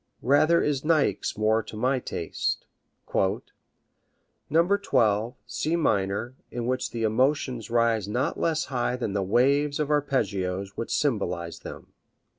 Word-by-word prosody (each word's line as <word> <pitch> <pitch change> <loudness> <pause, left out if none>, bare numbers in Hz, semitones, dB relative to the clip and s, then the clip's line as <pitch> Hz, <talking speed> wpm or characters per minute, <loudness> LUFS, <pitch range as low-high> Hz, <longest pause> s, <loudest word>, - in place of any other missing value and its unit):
Rather 155 +6 +4
is 140 -3 0
Niecks 155 -7 +1
more 110 +1 +2
to 105 0 -10
my 130 +4 +1
taste: 85 -8 -3 0.5
"No. 95 0 +1 1.1
12, 130 - +2
C 160 +3 -1
minor, 110 - 0 0.2
in 120 -1 -4
which 130 +1 -1
the 115 -1 -4
emotions 125 0 +1
rise 115 -3 +2
not 125 +6 -1
less 165 +1 +1
high 125 0 0
than 120 -5 -3
the 100 - 0
waves 140 +9 +2
of 150 -1 0
arpeggios 100 -9 -1
which 115 - -4
symbolize 90 - -1
them." - - -10
120 Hz, 130 wpm, -26 LUFS, 105-145 Hz, 1.1 s, Rather